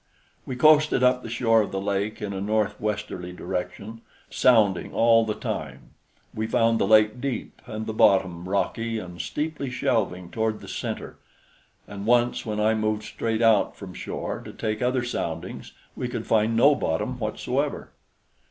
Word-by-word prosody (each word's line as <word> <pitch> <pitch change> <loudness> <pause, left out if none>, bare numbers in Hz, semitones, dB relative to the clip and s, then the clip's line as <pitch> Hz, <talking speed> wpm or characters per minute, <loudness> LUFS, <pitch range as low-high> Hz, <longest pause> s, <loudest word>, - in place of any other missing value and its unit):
We 130 - -3
coasted 150 0 +5
up 125 0 +4
the 115 - -8
shore 115 -1 +3
of 105 - -3
the 95 - -2
lake 100 +2 -2
in 100 -1 -3
a 95 - -4
north 105 0 0
westerly 100 -4 -3
direction, 95 +5 -5 0.3
sounding 105 -7 +3
all 115 0 +4
the 105 - -1
time. - - -5 0.4
We 110 0 -2
found 115 0 +2
the - - +2
lake 110 +2 +4
deep 135 -3 -4
and 110 0 -5
the 110 - -4
bottom 95 -5 +3
rocky 115 +3 -1
and 90 -5 -6
steeply 150 - -3
shelving 100 -8 -1
toward 110 -1 -1
the - - -12
center, - - -5 0.7
and 100 +1 -7
once 120 0 +2
when 105 -1 -2
I 110 +1 +3
moved 110 -1 -1
straight 115 +1 -2
out 110 -2 +4
from 95 -3 -9
shore - - -5
to - - -9
take 110 -1 -3
other 125 0 +1
soundings 85 -9 -4 0.2
we - - -3
could - - -5
find 110 +1 +2
no 140 +5 +6
bottom 125 - -2
whatsoever. 125 +6 -2
110 Hz, 165 wpm, -25 LUFS, 100-120 Hz, 0.7 s, no